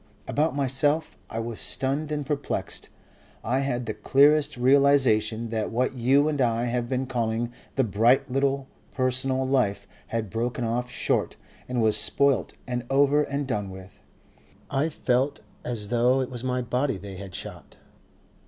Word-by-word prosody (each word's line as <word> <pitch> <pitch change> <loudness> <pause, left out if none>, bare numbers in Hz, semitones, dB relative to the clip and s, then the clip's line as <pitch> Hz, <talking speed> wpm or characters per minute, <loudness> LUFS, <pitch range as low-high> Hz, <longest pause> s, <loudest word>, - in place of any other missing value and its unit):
About 150 +1 0
myself, 145 +3 +1
I - - -6
was 115 -1 -4
stunned 140 +3 -1
and 145 -1 -2
perplexed. 145 0 -3 0.5
I 125 +5 0
had 125 -3 -1
the 110 - -3
clearest 140 +7 +3
realization 125 -4 +3
that 110 -2 -1
what 125 +3 0
you 135 +4 +3
and 150 -3 0
I 115 -1 +1
have 120 0 -2
been 130 0 -1
calling 120 -2 -2 0.2
the 135 - +3
bright 115 +6 +3
little 135 0 0 0.2
personal 130 +1 +1
life 105 -7 +1 0.2
had 110 -4 -3
broken 120 +2 -2
off 120 +2 -1
short - - 0 0.3
and 125 -2 0
was 110 -1 +3
spoilt 110 - +2
and 125 -1 -3
over 140 +2 +4
and 140 -1 -2
done 105 -6 -2
with. 95 0 -12 0.7
I 140 +4 +1
felt 135 -1 0 0.2
as 110 -4 -4
though 125 +2 +3
it 130 -1 -2
was 120 -1 -5
my 125 -1 -1
body 125 +1 -1
they 95 0 -9
had 95 -1 -8
shot. - - -9
125 Hz, 155 wpm, -26 LUFS, 115-135 Hz, 0.7 s, over